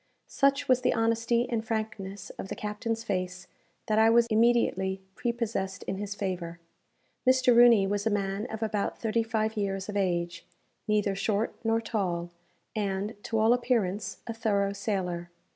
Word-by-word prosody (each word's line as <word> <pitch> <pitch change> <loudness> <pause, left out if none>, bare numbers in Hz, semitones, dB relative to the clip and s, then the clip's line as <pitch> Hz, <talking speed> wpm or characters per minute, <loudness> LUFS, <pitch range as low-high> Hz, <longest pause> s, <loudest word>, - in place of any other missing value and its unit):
Such 275 +1 +1
was 255 -1 +4
the - - +2
honesty 230 +1 +1
and 230 -2 -1
frankness 215 -3 -4
of - - -5
the - - -5
captain's 220 +2 -3
face, 185 -3 -3 0.4
that 215 0 +2
I 220 0 +6
was 235 +1 +5
immediately 215 -4 +2
prepossessed 230 -4 -2
in 190 - -3
his 205 0 -4
favour. 175 -3 -4 0.7
Mr. 255 -1 +5
Rooney 235 -4 +7
was 205 +2 -1
a - - +4
man 200 +1 -1
of 220 -2 -5
about 210 -2 -1
thirty 230 0 0
five 220 -1 -1
years 195 -1 -2
of 210 - -4
age, 175 -3 -1 0.4
neither 210 -2 +2
short 205 +2 0
nor 225 0 +2
tall, 180 -7 -2 0.4
and, 200 0 -1
to 225 - -1
all 220 +2 +5
appearance, 215 -6 -1
a 230 - -4
thorough 200 -3 0
sailor. 185 -4 -2
215 Hz, 160 wpm, -28 LUFS, 195-230 Hz, 0.7 s, Rooney